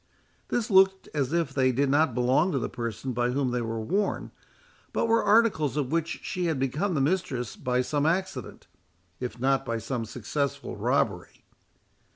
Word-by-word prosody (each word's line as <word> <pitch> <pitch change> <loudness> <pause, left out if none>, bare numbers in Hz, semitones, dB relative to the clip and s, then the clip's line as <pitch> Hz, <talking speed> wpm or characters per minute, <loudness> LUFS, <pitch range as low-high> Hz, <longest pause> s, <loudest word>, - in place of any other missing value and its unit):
This 230 -3 -1
looked 190 0 +4
as 140 -3 0
if 165 -5 0
they 130 -2 +3
did 140 +3 +1
not 145 -2 +2
belong 130 +9 +3
to - - +1
the 125 - -1
person 120 +2 -4
by 120 +1 +1
whom 130 0 0
they 125 0 -1
were 115 -1 -3
worn, 195 - -1 0.6
but - - +1
were 230 0 +3
articles 205 - +3
of 140 -2 -1
which 165 0 -1
she 180 -1 -2
had 160 -3 0
become 150 +9 -1
the 140 - +1
mistress 135 - -1
by 125 0 0
some 145 +3 0
accident, 175 - -2 0.5
if 125 -1 -5
not 135 +2 +2
by 115 -3 -2
some 115 +1 -3
successful 130 +6 -3
robbery. - - -1
135 Hz, 175 wpm, -27 LUFS, 125-170 Hz, 0.6 s, looked